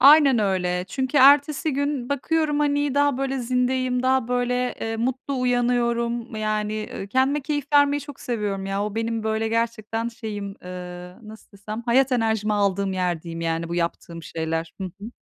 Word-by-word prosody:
Aynen 280 -3 +7
öyle. 180 -3 0
Çünkü 260 +7 -2
ertesi 285 +3 +5
gün 280 -2 -1
bakıyorum, 295 +2 0
hani, 290 -1 +1
daha, 285 -2 +2
böyle, 270 0 -1
zindeyim, 250 +1 0
daha, 260 -2 +2
böyle, 250 0 0
ııı, 225 0 -2
mutlu 260 +2 -2
uyanıyorum. 240 -2 0
Yani, 215 0 -2
ııı, 195 - -5
kendime 265 +6 +2
keyif 290 0 -2
vermeyi 285 0 +5
çok 285 -1 -10
seviyorum 205 -5 -2
ya! 195 +1 -1
O 210 - -4
benim, 225 0 -1
böyle, 220 0 0
gerçekten 230 0 -1
şeyim, 210 -4 -6
ııı, 180 +3 -9
nasıl 220 -1 -13
desem, 210 +3 -7
hayat 260 +2 +3
enerjimi 220 -3 +1
aldığım 200 -1 +1
yer, 180 -3 -1
diyeyim, 165 -1 -6
yani, 165 0 -1
bu 170 - -3
yaptığım 170 -1 -3
şeyler. 160 0 -3
Hı - - -2 0.2
hı. 215 +3 -7
230 Hz, 165 wpm, -24 LUFS, 200-260 Hz, 0.2 s, Aynen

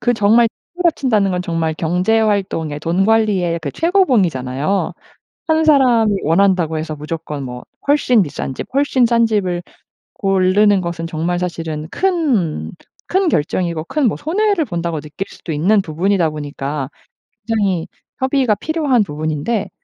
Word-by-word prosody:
그 245 - +2
정말 225 +2 +4 0.3
집을 360 - -4
합친다는 220 - +2
건 180 - -1
정말 165 -2 -1
경제 180 +7 +1
활동의, 190 -8 -1
돈 175 +5 +1
관리의 205 -7 +2
그 145 - -4
최고봉이잖아요. 195 - +1 0.6
1 320 0 +3
사람이 250 -8 +4
원한다고 170 -1 +2
해서 155 0 -4
무조건 150 -1 -5
뭐 125 -1 -7 0.2
훨씬 250 -7 +4
비싼 135 -3 -5
집, - - -6
훨씬 275 -3 +3
싼 235 -1 +3
집을 185 -5 -1 0.9
고르는 205 -2 +4
것은 170 -1 -4
정말 170 +2 -1
사실은 165 -3 -4
큰 295 - 0 0.4
큰 380 -1 +2
결정이고 165 - -1
큰 290 - 0
뭐 - - -2
'손해를 385 +3 +1
본다.'고 170 - -3
느낄 150 +6 -6
수도 165 - -7
있는 190 +8 +3
부분이다 175 +1 0
보니까 145 -2 -4 0.6
굉장히 200 -7 0 0.3
협의가 260 -3 +2
필요한 300 -5 +1
부분인데 155 +6 -2
190 Hz, 310 characters per minute, -18 LUFS, 160-235 Hz, 0.9 s, 정말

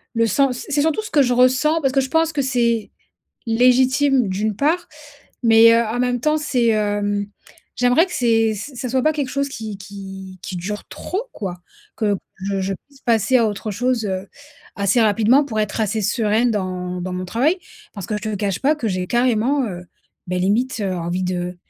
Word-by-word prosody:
le 230 0 +3
sens, 260 +3 +2
c - - -7
c'est 290 0 +1
surtout 320 +7 0
ce 430 - -8
que 290 - +4
je 250 -2 +2
ressens, 255 +6 +3
parce 270 -2 +1
que 270 - +3
je 265 - -4
pense 325 +1 +1
que 290 - 0
c'est 235 -4 0 0.6
légitime 255 +2 +3
d'une 205 +3 -1
part, 335 - 0 0.5
mais, 230 0 +7
heu, 230 - +4
en 225 +3 -3
même 245 0 0
temps, 305 +4 +2
c'est, 255 -5 0
hem, 205 -1 0 0.5
j'aimerais 250 +7 +4
que 360 - -11
c'est 225 -5 +2
ç 215 +8 -7
ça 250 - -4
soit 260 +1 +2
pas 310 - +3
quelque 285 -4 -2
chose 280 +2 -1
qui 220 -6 -7
qui 195 -1 -9
qui 185 - -5
dure 205 +4 -5
trop, 385 +4 -4
quoi. 190 -4 -5 0.4
Que 210 -3 +1 0.2
je 195 +1 -3
je 195 +1 -2
puisse 280 -1 -21
passer 230 +2 +3
à 230 - +3
autre 210 +1 -3
chose, 240 +2 0
heu, 190 0 -4 0.5
assez 200 +4 +2
rapidement 220 +6 +4
pour 225 -6 -4
être 210 +1 -2
assez 220 0 0
sereine 225 +3 +1
dans 180 -3 -3
dans 185 +1 -4
mon 185 0 -4
travail, 265 - +1 0.4
parce 200 -4 -6
que 215 - -3
je - - -15
te 215 - -2
cache 200 -2 -1
pas 290 +3 +3
que 235 -7 -2
j'ai 185 -2 -2
carrément, 245 +4 +1
heu, 180 -3 -7 0.4
beh, 180 0 -1
limite, 220 +7 0
heu, 190 -1 -1
envie 175 +2 -2
de 180 0 -3
225 Hz, 205 wpm, -20 LUFS, 200-260 Hz, 0.6 s, mais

